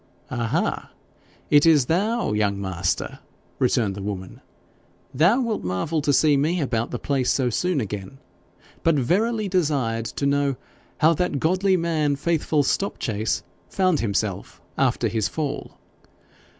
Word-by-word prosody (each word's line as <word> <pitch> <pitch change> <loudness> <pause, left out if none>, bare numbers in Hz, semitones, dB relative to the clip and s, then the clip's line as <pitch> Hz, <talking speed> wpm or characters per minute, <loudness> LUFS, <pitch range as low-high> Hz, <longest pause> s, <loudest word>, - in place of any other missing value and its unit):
'Aha! 120 -3 -1 0.6
is 145 +1 +6
it 150 -6 +5
thou, 210 - 0
young 100 -2 0
master?' 95 -3 -2 0.4
returned 120 -5 +2
the 100 - -7
woman. 95 -2 -6 0.7
'Thou 195 - +4
wilt 230 -3 -2
marvel 95 - -1
to 145 - +1
see 150 +1 +4
me 155 +6 +1
about 120 -6 -1
the 125 - -3
place 135 0 -1
so 125 -3 +1
soon 180 +5 0
again, 105 +1 -5 0.6
but 165 -1 +3
verily 210 - +1
desired 140 -11 0
to 140 - -3
know 140 -1 +1 0.5
how 160 +2 +6
that 165 -3 -1
godly 185 +4 +2
man, 160 -4 0
Faithful 155 0 +1
Stopchase, 115 - -1 0.3
found 185 - +1
himself 100 -3 -2 0.2
after - - +1
his 110 -3 0
fall.' 150 -3 -4
140 Hz, 135 wpm, -23 LUFS, 115-170 Hz, 0.7 s, is